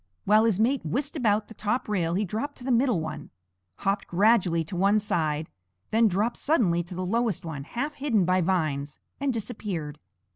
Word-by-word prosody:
While 215 +2 +5
his 215 -4 +2
mate 255 +4 +2
whisked 275 - -2
about 215 -6 +1
the - - -11
top 220 +4 -2
rail 175 -5 0
he 205 +3 +1
dropped 225 - -4
to - - -11
the 260 - -1
middle 240 -5 +3
one, 160 0 -6 0.5
hopped 200 +1 -1
gradually 180 -3 +3
to 170 +4 -7
one 200 +4 +3
side, 160 -6 -1 0.4
then 225 +1 +4
dropped 210 +5 0
suddenly 200 - +2
to 175 - -9
the 185 +1 -3
lowest 225 -2 0
one, 150 -4 -5
half 280 - -3
hidden 250 -10 +1
by 185 +1 +2
vines, 155 -5 -1 0.2
and 280 0 +1
disappeared. 195 - -4
205 Hz, 185 wpm, -26 LUFS, 170-230 Hz, 0.5 s, While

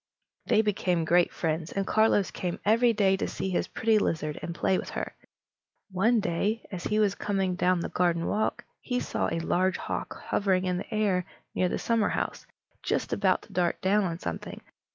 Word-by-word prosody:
They 220 - +4
became 180 -5 0
great 175 +2 +4
friends, 160 0 -2
and 195 0 -1
Carlos 215 -2 +3
came 175 -1 -3
every 230 +3 +4
day 200 -3 +3
to - - -2
see 190 - -3
his 180 - 0
pretty 225 -1 +2
lizard 155 -6 -1
and 170 - -5
play 190 - +1
with - - -6
her. - - -5 0.8
One 220 +6 +3
day, 205 +4 -1
as 180 -3 -5
he 210 - +1
was 210 -2 +3
coming 195 -3 -1
down 180 -1 +2
the - - -3
garden 170 -2 +1
walk, 215 +1 -1 0.2
he 250 -1 -1
saw - - -1
a 165 - -1
large 185 +2 +1
hawk - - -4
hovering 190 -2 +1
in 180 -1 0
the - - -8
air 200 -5 +1 0.3
near 180 - +1
the - - -1
summerhouse, 230 -2 -1 0.3
just - - -1
about 190 -2 +2
to - - -16
dart 175 -1 +1
down 200 +2 +3
on 170 -2 -2
something. - - -6
190 Hz, 190 wpm, -28 LUFS, 175-210 Hz, 0.8 s, They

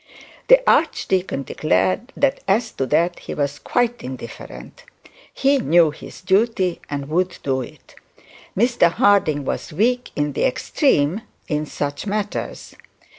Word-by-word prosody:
The - - +6
archdeacon 185 -7 +1
declared 95 - 0
that 280 -1 +2
as 220 +4 +1
to 135 - -3
that 170 +5 +1
he - - -7
was 145 0 -2
quite 240 -1 0
indifferent. 130 - -9 0.5
He 275 0 +2
knew 170 -8 +4
his 150 - -12
duty 190 -1 +1
and 140 -1 -3
he 145 - -12
would 180 +2 0
do 130 -1 0
it. 125 - -12 0.6
Mr 235 -6 +3
Harding 160 -8 +2
was - - -4
weak 245 +9 0
in 145 -1 -1
the - - 0
extreme 215 - +1 0.3
in 150 -1 -2
such 145 +7 -4
matters. 210 0 -4
180 Hz, 135 wpm, -21 LUFS, 145-230 Hz, 0.6 s, The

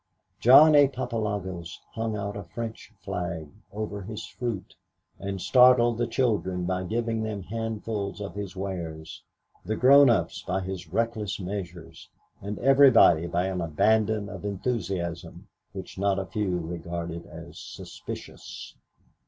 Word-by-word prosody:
John 150 +6 +8
A. 145 -1 +7
Papalogos 105 -9 -4 0.2
hung 110 -1 -2
out 100 0 -4
a 100 - -5
French 115 +6 -7
flag 85 -4 -4 0.2
over 105 -1 -4
his 110 +3 -6
fruit 120 -6 -5 0.4
and 100 0 -4
startled 125 +1 +5
the 120 - +1
children 105 -8 0
by 90 +1 -1
giving 115 +2 -1
them 110 -3 -4
handfuls 110 -1 -4
of 100 -4 -6
his 100 -1 -6
wares, 85 -5 -6 0.4
the 110 +4 -2
grown 140 +3 +7
ups 95 -5 +1
by 95 +1 -2
his 95 -2 -6
reckless 110 -1 -1
measures 95 0 -7 0.3
and 100 +1 -5
everybody 130 - +6
by 85 +1 0
an 95 -2 -2
abandon 105 +6 +2
of - - -8
enthusiasm 95 -5 -3 0.2
which 95 -1 -8
not 100 0 +2
a 95 - -2
few 95 -3 -1
regarded 85 0 -5
as - - -11
suspicious. - - -9
100 Hz, 135 wpm, -27 LUFS, 90-115 Hz, 0.4 s, John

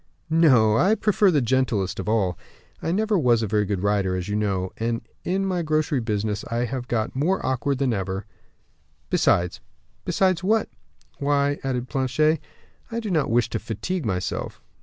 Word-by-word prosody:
"No; 130 -10 +5
I 200 - +4
prefer 210 -1 +3
the 150 -7 +2
gentlest 115 -7 0
of 95 - -3
all; 100 -6 +1 0.5
I 165 - -1
never 210 +1 +1
was 120 -5 +3
a - - -1
very 105 +1 +1
good 100 -1 -2
rider, 100 -2 +1
as 90 +1 -4
you 105 - -1
know, 95 -3 -1
and 115 0 -2 0.2
in 190 +2 0
my 185 -2 0
grocery 155 -3 +1
business 105 -2 -2
I 120 +1 0
have 125 0 -4
got 110 -1 -1
more 165 +8 0
awkward 130 +1 0
than 130 -3 +1
ever; 95 -1 -3 0.9
besides 90 0 +2 0.2
" - - -40
"Besides 185 -2 +1
what?" 215 +3 +2 0.5
"Why," 145 0 +1
added 125 -2 -2
Planchet, 150 +4 +1 0.5
"I 230 - -3
do 220 -4 -4
not 155 -5 +1
wish 120 +1 +2
to 110 - -1
fatigue 145 - -3
myself." 90 -2 -3
125 Hz, 175 wpm, -24 LUFS, 105-160 Hz, 0.9 s, No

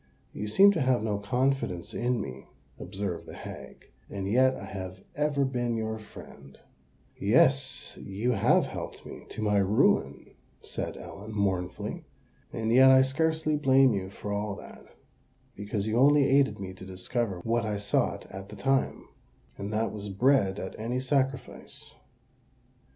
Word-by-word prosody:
"You 105 - -4
seem 195 - +7
to 165 - -1
have 130 -4 +2
no 105 -2 -1
confidence 125 -5 -1
in 120 0 0
me," 65 -10 -7 0.3
observed 95 -1 -5
the - - -9
hag; - - -10 0.2
"and 100 -1 -4
yet 130 +5 +4
I - - -8
have 95 -1 -7
ever 145 -2 +1
been 120 -3 -1
your 110 0 -3
friend." 70 -9 -13 0.6
"Yes—you 105 +6 +1
have 105 -5 +3
helped - - -7
me - - -10
to 110 - -5
my 105 -1 +2
ruin," 100 +2 +1 0.3
said - - -5
Ellen, 105 +2 -9
mournfully. 95 -3 -2 0.5
"And 110 0 -1
yet 130 +2 +8
I 130 0 +7
scarcely 160 +3 +1
blame 135 -3 +5
you 95 -2 -3
for 100 +1 -6
all 100 0 -2
that, - - -12 0.7
because 100 0 -3
you 110 +2 +1
only 145 +1 +6
aided 135 -3 +3
me 95 -1 -6
to 95 - -12
discover 95 +2 -3
what 115 +1 +1
I 105 -1 -2
sought 100 0 0
at 95 +1 -8
the 105 - -9
time—and 105 -3 -3
that 110 +1 0
was 105 -1 -6
bread 100 -1 +2
at 95 - -5
any 120 +3 -2
sacrifice. 135 0 -2
110 Hz, 150 wpm, -28 LUFS, 100-130 Hz, 0.7 s, yet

